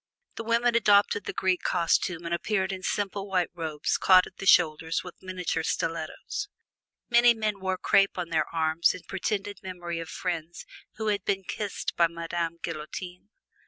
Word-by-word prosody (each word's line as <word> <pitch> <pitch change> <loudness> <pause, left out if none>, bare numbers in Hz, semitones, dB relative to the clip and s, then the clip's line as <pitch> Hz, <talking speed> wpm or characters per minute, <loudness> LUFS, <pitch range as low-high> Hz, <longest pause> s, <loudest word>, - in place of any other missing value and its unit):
The 230 - -6
women 235 +1 +2
adopted 205 -3 +4
the - - -3
Greek 185 -1 0
costume 170 0 +1
and 170 - -2
appeared 190 +2 0
in 190 -1 -5
simple 200 0 -2
white 185 -3 0
robes 160 -4 -2
caught 185 -1 +6
at 185 - -14
the 195 - -5
shoulders 160 -2 +4
with 180 - -11
miniature 185 -3 -2
stilettos. 165 - -3 0.6
Many 240 0 +6
men 215 -2 -2
wore 190 0 -1
crape 195 +1 +3
on 175 -2 -3
their 160 -2 0
arms 160 0 +2
in 180 - -10
pretended 200 +1 -3
memory 175 -3 -5
of 165 - -6
friends 170 -2 -4 0.3
who 220 0 -2
had 205 -2 0
been 195 0 -1
kissed 205 +2 -4
by 170 - +4
Madame 170 0 -3
Guillotine. 175 +4 -6
185 Hz, 165 wpm, -27 LUFS, 170-200 Hz, 0.6 s, caught